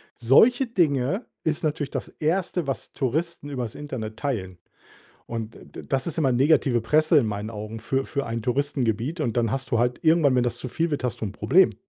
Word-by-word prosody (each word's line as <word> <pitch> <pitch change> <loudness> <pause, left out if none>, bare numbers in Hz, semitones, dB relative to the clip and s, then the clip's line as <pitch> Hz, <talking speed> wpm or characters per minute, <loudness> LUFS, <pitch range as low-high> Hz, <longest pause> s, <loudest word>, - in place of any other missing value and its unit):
Solche 225 - +5
Dinge 175 - +1 0.2
ist 155 +1 -1
natürlich 145 -2 -1
das - - -4
1. 170 0 0
was 135 - -4
Touristen 145 +3 -2
übers 125 -5 -4
Internet 115 -7 -6
teilen 95 - -3 0.7
und 115 -1 -5 0.2
d - - -6
das 135 +1 0
ist 170 - -3
immer 135 -5 +2
negative 130 -2 +3
Presse 155 +6 +4
in 120 - +2
meinen 105 +1 -3
Augen 110 +1 -6
für 135 +4 -1
für 140 -1 -2
ein 115 0 -3
Touristengebiet 125 - -1
und 120 -5 -1
dann 115 -3 +2
hast 135 -1 -3
du 115 - +2
halt 120 +1 +1
irgendwann, 160 -4 +4
wenn 125 - +3
das 120 -1 -1
zu 125 - -5
viel 165 +6 -1
wird, 145 -3 -2
hast 120 - -2
du 110 - -1
'n 100 - -5
Problem. 185 - +4
135 Hz, 200 wpm, -25 LUFS, 115-155 Hz, 0.7 s, Solche